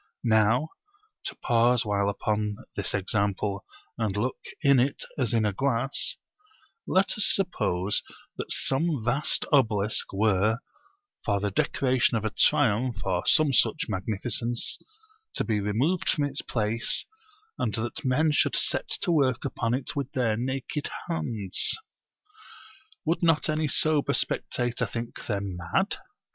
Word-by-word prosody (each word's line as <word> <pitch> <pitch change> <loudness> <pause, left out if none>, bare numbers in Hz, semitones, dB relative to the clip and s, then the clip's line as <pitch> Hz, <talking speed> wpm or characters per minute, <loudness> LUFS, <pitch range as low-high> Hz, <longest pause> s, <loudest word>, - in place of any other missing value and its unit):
Now 115 +6 +3 0.6
(to - - -4
pause 120 0 +3
while 100 -1 0
upon 105 +1 -2 0.2
this - - -1
example 100 0 -1 0.4
and 105 -3 -1
look 120 +5 -2 0.2
in 140 -2 +5
it 135 +3 0
as 125 -6 0
in 115 -2 +2
a 105 - 0
glass) 135 +3 +1 0.7
let 190 +1 +2
us 205 - +5
suppose 105 - +1 0.3
that - - -6
some 140 -2 0
vast 135 +5 +3
obelisk 110 -6 +2
were 105 +2 +2 0.7
(for 100 -2 0
the 100 0 -2
decoration 125 +3 +1
of 110 - -4
a 110 - -1
triumph 110 +1 +2
or 90 -2 -1
some 155 -3 +4
such - - +3
magnificence) 115 +5 -1 0.6
to - - +1
be 110 -2 0
removed 120 - 0
from 150 - +2
its 140 -1 -1
place, 115 0 +1 0.5
and 110 - -1
that 120 +8 -3
men 150 +4 +2
should 150 - +2
set - - +2
to - - +1
work 135 -7 +1
upon 120 -3 -1
it 130 - -3
with 140 -1 -3
their 120 -4 +1
naked 130 +4 -3 0.2
hands; 110 - +2 1.3
would 165 - 0
not 165 -3 +2
any 155 0 0
sober 155 0 +2
spectator 120 -1 -1
think 115 0 -7
them 100 -4 -3
mad? 85 -1 -1
115 Hz, 135 wpm, -26 LUFS, 105-135 Hz, 1.3 s, in